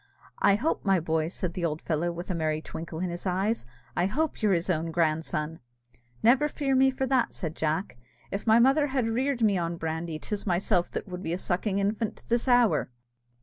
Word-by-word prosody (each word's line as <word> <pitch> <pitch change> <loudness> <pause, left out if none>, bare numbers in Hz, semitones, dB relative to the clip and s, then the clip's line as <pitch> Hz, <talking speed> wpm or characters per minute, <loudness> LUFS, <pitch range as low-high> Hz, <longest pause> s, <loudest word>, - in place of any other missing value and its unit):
I 200 - +5
hope, 275 +10 -1
my 195 -2 +3
boy," 160 -1 0
said 175 0 -4
the 180 - -4
old 155 -2 0
fellow, 165 +2 -1
with 175 +2 -5
a - - 0
merry 155 -2 0
twinkle 160 +1 -7
in 180 -1 -1
his 175 +3 -5
eyes, 190 - 0 0.3
"I 175 +1 +2
hope 305 +9 -1
you're 210 -2 +3
his 170 -1 0
own 165 -2 0
grandson!" 160 -1 -1 0.6
"Never 255 +6 +5
fear 280 -2 -1
me 265 0 +5
for 265 0 -1
that," 260 -3 +1
said 160 -4 -4
Jack; 160 +1 -1 0.3
"if 200 +3 -4
my 220 +1 +7
mother 270 +5 +4
had 265 -2 0
only 225 0 -1
reared 255 0 0
me 200 -4 +3
on 170 0 -2
brandy, 160 0 -3
'tis 205 +6 -5
myself 180 0 +1
that - - -5
would 180 -1 -6
be 165 -2 -2
a - - -1
sucking 190 +2 -1
infant 210 +2 -1
to - - -16
this 235 +2 +1
hour!" 245 - +4
185 Hz, 215 wpm, -28 LUFS, 165-230 Hz, 0.6 s, my